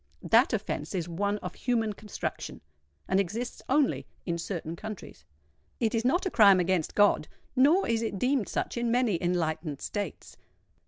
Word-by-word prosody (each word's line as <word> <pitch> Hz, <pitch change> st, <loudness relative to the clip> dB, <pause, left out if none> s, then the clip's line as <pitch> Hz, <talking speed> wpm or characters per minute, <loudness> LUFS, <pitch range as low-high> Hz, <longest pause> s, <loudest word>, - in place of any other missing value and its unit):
That -, -, +4 dB
offence -, -, -3 dB
is 175 Hz, -2 st, -2 dB
one 200 Hz, +4 st, -1 dB
of -, -, -5 dB
human 225 Hz, -4 st, 0 dB
construction, 210 Hz, 0 st, -6 dB, 0.5 s
and 190 Hz, -, +2 dB
exists 215 Hz, +6 st, -3 dB
only 280 Hz, +1 st, +2 dB, 0.2 s
in 170 Hz, -2 st, -2 dB
certain 165 Hz, -2 st, -4 dB
countries: 215 Hz, +2 st, -9 dB, 0.5 s
it 225 Hz, -3 st, +1 dB
is 230 Hz, -1 st, +1 dB
not 330 Hz, +11 st, +2 dB
a 375 Hz, -, -1 dB
crime 200 Hz, -4 st, +7 dB
against 180 Hz, -2 st, 0 dB
God—nor 255 Hz, -, +3 dB
is 230 Hz, -1 st, +1 dB
it 220 Hz, -3 st, -2 dB
deemed 250 Hz, -3 st, +1 dB
such -, -, -2 dB
in 235 Hz, 0 st, 0 dB
many 235 Hz, -7 st, +2 dB
enlightened 160 Hz, -4 st, -1 dB
states. 205 Hz, -6 st, -5 dB
205 Hz, 155 wpm, -28 LUFS, 175-240 Hz, 0.5 s, crime